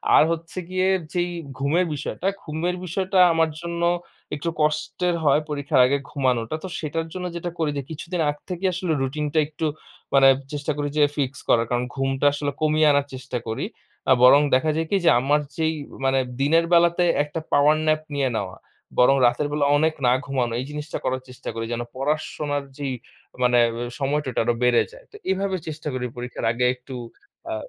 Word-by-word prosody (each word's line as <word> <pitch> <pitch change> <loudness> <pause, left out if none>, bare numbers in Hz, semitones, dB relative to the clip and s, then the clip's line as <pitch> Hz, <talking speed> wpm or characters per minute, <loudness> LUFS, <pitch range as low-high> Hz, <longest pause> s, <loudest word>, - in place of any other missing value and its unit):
আর - - +8
হচ্ছে 165 +2 -5
গিয়ে 185 0 +1 0.3
যেই 175 0 0 0.3
ঘুমের 150 +7 +2
বিষয়টা, 175 +6 -4 0.2
ঘুমের 165 +3 -2
বিষয়টা 190 +2 -1 0.2
আমার 165 0 +2
জন্য 170 0 -4 0.5
একটু 150 +3 -3
কষ্টের 155 +3 0
হয় 145 +1 +4
পরীক্ষার 140 -3 +2
আগে 140 +3 +2
ঘুমানোটা। 130 -2 0
তো - - -4
সেটার 160 +1 -3
জন্য 185 -1 -4
যেটা 170 +1 -3
করি 155 -2 +1
যে, 140 - -1
কিছুদিন 170 +3 -5
আগ 145 - -1
থেকেই 185 +1 0
আসলে 180 -2 -1
রুটিন 150 +3 -2
টা 160 - 0
একটু 155 +1 -4 0.5
মানে 135 -1 +7 0.3
চেষ্টা 145 +1 -2
করি 145 0 -1
যে 150 - +5
ফিক্স 140 -1 -1
করার। 115 -1 +4
কারণ 120 0 0
ঘুমটা 135 +1 -1
আসলে 145 0 -2
কমিয়ে 155 0 +3
আনার 145 0 +2
চেষ্টা 130 -1 -5
করি। 110 - -2 0.4
আ - - +5
বরং 140 +3 +8
দেখা 130 +5 +2
যায় 160 0 -1
কি 200 - +3
যে, - - +7
আমার 145 +4 +2 0.2
যেই 160 0 +1 0.3
মানে 135 0 +3 0.2
দিনের 165 +4 +4
বেলাতে 170 +1 +4 0.2
একটা 150 +2 -5
পাওয়ার 145 +2 +5
ন্যাপ 155 0 +2
নিয়ে 140 -2 +1
নেওয়া, 100 -4 -3 0.4
বরং 125 +2 +6
রাতের 120 +5 +2
বেলা 145 -1 +1
অনেক 160 +2 +2
না - - +5
ঘুমানো 130 -4 -1
এই 130 - -3
জিনিসটা 150 0 -5
করার 130 0 -1
চেষ্টা 125 - -8
করি, 115 0 -4
যেন 120 - -2
পড়াশোনার 145 0 -2
যেই 140 -2 -3 0.5
মানে 125 -1 +4 0.4
সময়টা 145 0 0
আরো 120 - +2
বেড়ে 125 -1 +4
যায়। - - -15
তো - - -15 0.2
এভাবে 190 0 0
চেষ্টা 155 0 -6
করি 125 -1 -2
পরীক্ষার 125 +1 -5
আগে 125 +2 0
একটু 125 +1 -10 0.6
আ - - -1
150 Hz, 185 wpm, -23 LUFS, 135-165 Hz, 0.6 s, আর